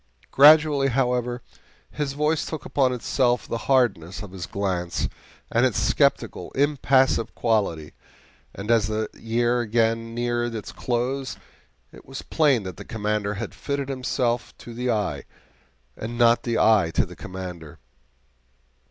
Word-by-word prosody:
Gradually, 150 -1 +6
however, 125 -1 0 0.5
his 145 -2 -3
voice 150 +2 +1
took 155 - -6
upon 130 -3 +2
itself 125 0 0
the 115 - -3
hardness 115 -10 +1
of 100 - -9
his 90 -3 -6
glance 90 -2 -2 0.4
and - - +2
its - - +2
skeptical, - - +1
impassive 135 -4 +2
quality, 100 -10 0 0.6
and 105 +4 -3
as 110 -4 +3
the 110 0 -2
year 120 +2 0
again 115 0 0
neared 120 -1 -1
its 110 - -6
close 130 +2 -2 0.5
it - - -14
was 135 0 -8
plain 140 -8 +2
that 95 -3 -7
the - - -8
Commander 105 -1 -2
had 115 +3 -5
fitted 140 -1 -3
himself 125 -2 -2
to 120 - -10
the 125 +2 -3
eye, 100 -11 -1 0.7
and 115 +2 -6
not 120 0 +4
the 115 -1 -1
eye 105 -6 +4
to - - +3
the - - -12
Commander. 90 -4 -8
120 Hz, 140 wpm, -24 LUFS, 105-130 Hz, 0.7 s, Gradually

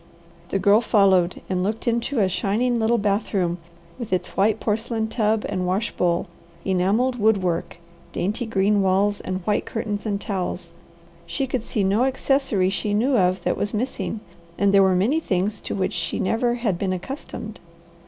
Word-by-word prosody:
The - - 0
Girl 200 +3 +4
followed 190 -6 +3
and 185 -1 -1
looked 215 +5 -2
into 235 +1 +1
a 195 - +3
shining 230 +6 0
little 225 +1 +2
bathroom, 200 -4 0 0.4
with 235 -5 -6
its 185 - 0
white 210 +3 +2
porcelain 220 +1 -1
tub 220 -1 +1
and 185 -2 -2
wash 195 +5 0
bowl, 175 -1 0 0.4
enamelled 200 +7 +1
wood 215 -3 +3
work, 170 -1 -2 0.3
dainty 215 +6 -2
green 205 -1 +2
walls, 195 +2 +2
and 185 0 -4
white 210 - 0
curtains 220 -2 -3
and 200 -1 -1
towels. 180 -4 -4 0.5
She 170 +11 -1
could 260 -2 -2
see 215 -2 -2
no 205 +6 +2
accessory 265 -7 +1
she 205 +1 -1
knew 255 +6 +2
of 185 -3 +2
that - - 0
was 205 +2 -2
missing, 225 -2 -3 0.4
and 200 0 +2
there 200 - +7
were 190 -1 +4
many 230 - +2
things 200 - -1
to - - -4
which 190 -2 -1
she - - -2
never 240 +5 +1
had 215 -8 -1
been 190 -2 0
accustomed. 220 +1 -7
205 Hz, 175 wpm, -23 LUFS, 190-230 Hz, 0.5 s, there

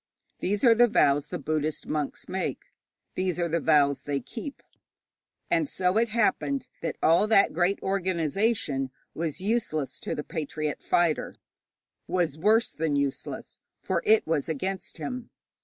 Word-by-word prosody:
These 200 +2 -1
are 235 -3 +8
the 240 +2 +5
vows 145 -9 +3
the - - -4
Buddhist 155 +1 -2
monks 150 -2 -3
make, - - -4 0.4
these 185 -2 -1
are 175 -1 +1
the 170 +1 0
vows 145 -3 +3
they 145 -1 -2
keep; 245 - -8 0.8
and 330 -4 +1
so 180 +2 +1
it 230 +1 +3
happened 235 +5 +1 0.2
that 165 - -3
all 170 +6 +5
that 215 -2 +4
great 180 +4 +1
organization 185 - 0 0.2
was 165 0 -3
useless 195 - -1
to - - -3
the 150 - -4
patriot 155 -1 -4
fighter, 170 -3 +1 0.7
was 175 -6 0
worse 215 +8 +3
than 155 -2 -1
useless, 140 -1 -3 0.2
for - - 0
it 220 0 +4
was 160 -1 -1
against 185 +5 -3
him. 250 -1 -5
175 Hz, 145 wpm, -27 LUFS, 150-215 Hz, 0.8 s, are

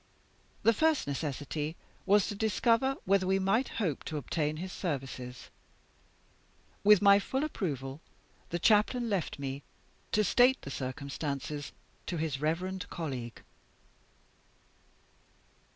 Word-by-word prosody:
The 230 - +6
first 315 +5 +2
necessity 145 +2 -3 0.3
was 205 0 +5
to 215 - -3
discover 230 +5 +2
whether 190 0 +3
we 190 +1 +3
might 195 +7 +2
hope 175 - -1
to 155 - -3
obtain 150 +2 -1
his 185 +3 -5
services. 130 - -5 1.3
With 205 0 +7
my 200 0 +8
full 265 +7 -2
approval 145 - -3 0.5
the 175 - -1
Chaplain 220 +5 +3
left 190 -5 -1
me, 140 0 -4 0.5
to 215 - +3
state 250 +6 +5
the 140 - -6
circumstances 140 +2 -4 0.4
to 175 - -2
his 155 -4 -2
reverend 180 +5 -1
colleague. 130 -8 -5
175 Hz, 115 wpm, -31 LUFS, 140-210 Hz, 1.3 s, my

